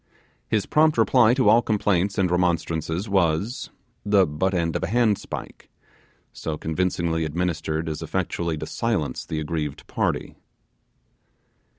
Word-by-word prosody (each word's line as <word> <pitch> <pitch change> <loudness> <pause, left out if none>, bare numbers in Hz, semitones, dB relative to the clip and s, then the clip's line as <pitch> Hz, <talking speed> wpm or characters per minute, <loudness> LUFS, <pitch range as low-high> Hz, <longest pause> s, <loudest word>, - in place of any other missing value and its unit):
His 105 -2 0
prompt 155 -1 +3
reply 115 +1 +5
to 130 -5 +2
all 115 +3 +6
complaints 100 -3 0
and 95 -3 +2
remonstrances 85 0 0
was 95 +3 0 0.3
the 100 -2 +4
butt 90 +5 -1
end 85 -2 0
of - - -1
a - - -1
handspike, 110 0 -1 0.6
so 80 -1 -4
convincingly 80 0 -1
administered 80 0 -2
as 80 -1 -4
effectually 85 -3 -2
to 75 - -5
silence 95 - -2
the 80 - -3
aggrieved 75 -2 -4
party. - - -2
90 Hz, 125 wpm, -24 LUFS, 80-105 Hz, 0.6 s, all